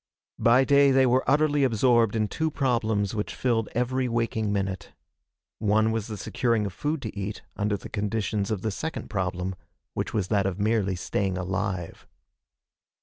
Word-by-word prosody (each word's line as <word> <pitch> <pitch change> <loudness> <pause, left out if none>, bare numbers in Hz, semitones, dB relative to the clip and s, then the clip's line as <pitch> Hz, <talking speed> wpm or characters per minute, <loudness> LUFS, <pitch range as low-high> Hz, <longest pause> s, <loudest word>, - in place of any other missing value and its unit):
By 120 +3 +5
day 140 0 +5
they 135 0 +5
were 130 +1 +3
utterly 145 0 +3
absorbed 115 -2 +3
in 110 -1 +1
two 160 +8 -1
problems 115 -8 0
which 105 -1 -3
filled 115 -4 0
every 125 +2 0
waking 115 -2 0
minute. 95 -2 -3 0.7
One 110 +1 +2
was 110 -2 -2
the 110 -2 -5
securing 115 +1 0
of 100 - -4
food 150 +4 -2
to 110 - -5
eat, 100 +1 -5
under 105 0 0
the - - -9
conditions 105 -1 -2
of 105 -4 -2
the 110 - 0
second 160 +11 -5
problem, 95 -1 -2 0.4
which - - -3
was 100 -4 -1
that 100 -3 +2
of 95 0 -3
merely 105 -2 +1
staying 95 +1 -1
alive. 95 -1 -3
110 Hz, 165 wpm, -26 LUFS, 100-125 Hz, 0.7 s, By